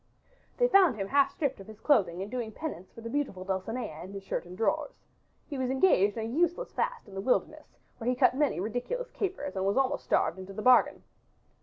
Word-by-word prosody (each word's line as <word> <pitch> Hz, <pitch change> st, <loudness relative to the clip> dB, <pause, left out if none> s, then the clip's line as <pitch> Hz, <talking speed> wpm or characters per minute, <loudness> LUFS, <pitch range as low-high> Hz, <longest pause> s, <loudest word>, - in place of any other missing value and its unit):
They -, -, +4 dB
found 390 Hz, -, +5 dB
him 195 Hz, -2 st, -3 dB
half 280 Hz, 0 st, +4 dB
stripped 275 Hz, -6 st, -2 dB
of 195 Hz, -, -11 dB
his 215 Hz, -1 st, -12 dB
clothing 190 Hz, -, +2 dB
and 205 Hz, -, -8 dB
doing 240 Hz, -3 st, -3 dB
penance 220 Hz, -, -6 dB
for 230 Hz, -, -12 dB
the 230 Hz, -, -6 dB
beautiful 270 Hz, -10 st, -2 dB
Dulcinea 190 Hz, -2 st, -4 dB
in 190 Hz, +2 st, -9 dB
his 195 Hz, -1 st, -7 dB
shirt 195 Hz, -, -3 dB
and 180 Hz, +1 st, -10 dB
drawers. 225 Hz, -, 0 dB, 0.5 s
He 280 Hz, -, -6 dB
was 255 Hz, -1 st, -1 dB
engaged 245 Hz, -, +3 dB
in 220 Hz, -, -2 dB
a -, -, -3 dB
useless 350 Hz, +8 st, +1 dB
fast -, -, -2 dB
in 200 Hz, -, -13 dB
the 195 Hz, -, -4 dB
wilderness 250 Hz, +5 st, -1 dB, 0.2 s
where 235 Hz, +1 st, -1 dB
he 250 Hz, -, +1 dB
cut 250 Hz, 0 st, +4 dB
many 285 Hz, -, +1 dB
ridiculous 245 Hz, -, -3 dB
capers 365 Hz, -, -3 dB
and 190 Hz, -, -1 dB
was 200 Hz, +4 st, +1 dB
almost 270 Hz, +1 st, +1 dB
starved 180 Hz, -, +1 dB
into 190 Hz, +1 st, -8 dB
the 215 Hz, -, -5 dB
bargain. 255 Hz, -1 st, +5 dB
245 Hz, 220 wpm, -29 LUFS, 195-285 Hz, 0.5 s, found